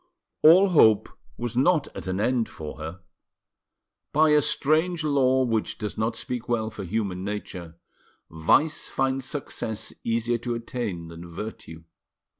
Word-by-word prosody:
All 185 +5 +7
hope 110 - +5 0.3
was 120 -1 -4
not 150 +4 +3
at - - -7
an 95 +1 -2
end 120 +1 +1
for 75 0 -8
her. 80 +4 -7 1.1
By 155 +1 +4
a 150 0 +5
strange 155 +3 +1
law 130 -3 +3
which 115 -3 -1
does 105 -3 -4
not 110 +1 -1
speak 125 +1 -5
well 110 -2 0
for 105 -2 -7
human 95 -1 -2
nature, 95 -5 -6 0.5
vice 115 - +1
finds 135 -1 -1
success 110 -6 -5
easier 115 +1 0
to 120 0 -3
attain 115 -8 -4
than 85 +1 -10
virtue. 85 -3 -8
115 Hz, 140 wpm, -25 LUFS, 100-135 Hz, 1.1 s, All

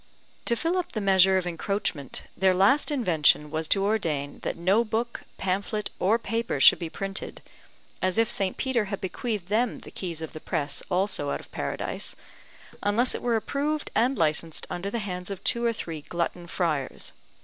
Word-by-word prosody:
To 235 - +4
fill 330 +8 0
up 355 0 -4
the 220 - -1
measure 190 -1 +5
of 185 - -1
encroachment, 170 -5 -2
their 190 -1 +3
last 205 - +5
invention 160 - +3
was 160 0 0
to 195 +3 +3
ordain 160 -10 -1
that - - -3
no 190 +7 +3
book, 235 +1 -2 0.2
pamphlet, 200 +3 -1
or 205 +5 +4
paper 230 -8 -2
should - - +8
be 170 -2 -4
printed 195 +3 -5 0.6
(as 185 +2 +1
if 225 +1 +3
St. 190 -2 +1
Peter 250 -5 +1
had 200 0 -4
bequeathed 205 -1 -3
them 225 +3 +1
the - - -11
keys 170 -4 -5
of 160 - -7
the 155 - -7
press 150 -4 -1
also 185 -5 0
out - - -1
of - - -14
Paradise) - - -3 0.7
unless 220 +5 +2
it - - -4
were 240 -1 +1
approved 285 +7 -1
and 250 +4 +2
licensed 160 0 0
under 185 +3 -3
the 235 - -2
hands 180 -4 -4
of 195 -2 -6
two 235 - +2
or 235 - +3
three 165 -8 -5
glutton 170 +2 -3
friars. 160 -6 -1
195 Hz, 180 wpm, -27 LUFS, 170-225 Hz, 0.7 s, should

